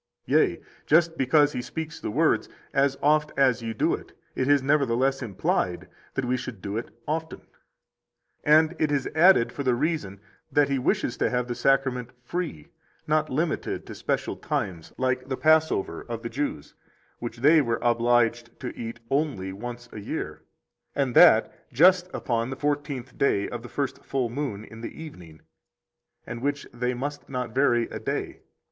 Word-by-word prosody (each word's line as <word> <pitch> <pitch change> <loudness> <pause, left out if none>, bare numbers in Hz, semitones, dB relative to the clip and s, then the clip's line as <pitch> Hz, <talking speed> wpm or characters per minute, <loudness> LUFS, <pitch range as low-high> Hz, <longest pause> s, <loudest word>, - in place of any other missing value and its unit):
Yea, - - +3 0.3
just 165 +1 +4
because 145 +2 +3
He - - -2
speaks 160 +5 -6
the - - -4
words, - - +2 0.2
As 135 0 +2
oft 150 +1 +3
as 130 -3 +3
ye 115 -1 -3
do 110 - +1
it, - - -7 0.2
it 130 - 0
is 145 -2 +4
nevertheless 135 -1 +2
implied 95 -5 -1 0.3
that 130 - -1
we 125 +1 +1
should 120 -5 -7
do 100 +2 -5
it 115 - -3 0.2
often; 160 +1 -3 1.0
and 155 +3 +5
it 155 -1 +1
is 140 -2 +1
added 160 -7 +5
for 140 - -5
the 130 -3 +2
reason 135 - -2 0.3
that 145 -1 +3
He 135 -1 +1
wishes 125 -1 0
to - - +1
have 125 0 -1
the 120 - -2
Sacrament 130 -2 +1
free, 160 - -4 0.4
not 155 0 +1
limited 155 +5 -2
to - - -8
special - - -2
times, 90 -5 -3
like 130 0 0
the 130 - -2
Passover 155 - +2
of 115 0 -5
the 115 - -3
Jews, 115 - -4 0.5
which 120 0 -5
they 150 +6 +6
were 115 -4 0
obliged 120 0 +2
to 125 - -5
eat 115 0 -6
only 135 -10 0
once 120 +4 -7
a - - -7
year, 100 - -5 0.5
and 135 -3 0
that 110 - +5
just 180 +7 +5
upon 115 0 -1
the 135 - -4
fourteenth 140 -2 -3
day 100 -7 +2
of 120 - -6
the 120 - -10
first 140 -2 -3
full 130 -4 -1
moon 120 -6 -4
in 110 +1 -12
the 115 - -7
evening, 85 - -12 0.8
and 120 0 -6
which 145 +1 -1
they 125 +1 -1
must 145 +4 -5
not 125 -4 -3
vary 125 -3 +3
a - - -6
day. - - -4
130 Hz, 170 wpm, -26 LUFS, 115-145 Hz, 1.0 s, they